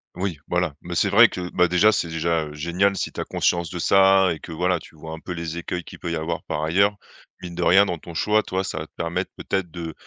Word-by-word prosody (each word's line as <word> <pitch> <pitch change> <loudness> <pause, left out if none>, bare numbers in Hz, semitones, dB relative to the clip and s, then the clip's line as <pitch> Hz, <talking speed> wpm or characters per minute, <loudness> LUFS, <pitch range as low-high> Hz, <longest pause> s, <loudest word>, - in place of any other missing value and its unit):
Oui, 90 -4 -3
voilà 90 -4 0
mais 85 0 -6
c'est - - +2
vrai - - +8
que, 90 -1 -5
bah, 90 -1 +3
déjà 90 +5 +4
c'est 90 - 0
déjà, 80 0 0
heu, 75 - -9
génial 85 +6 +1
si - - -2
tu - - -9
as - - -4
conscience 85 -1 0
de 90 - -6
ça 95 +1 +5
et 80 - -9
que, - - -10
voilà, 90 +2 0
tu 80 - -16
vois 80 +1 -9
un 80 - -7
peu 90 - -8
les 85 -1 -4
écueils 90 +1 -4
qu'il - - -12
peut 85 - -4
y - - -1
avoir 80 +1 -3
par 75 - -3
ailleurs. 100 +6 +3 0.5
Mine 90 -1 -6
de 90 - -4
rien, 95 +4 +6
dans 85 -4 -3
ton 85 - -11
choix, 105 +5 +2
toi, 95 -1 -2
ça 95 - -4
va 80 - -6
te - - -47
permettre 85 0 -2
peut-être 95 -3 -2
de 80 -2 -6
85 Hz, 275 wpm, -23 LUFS, 80-95 Hz, 0.5 s, vrai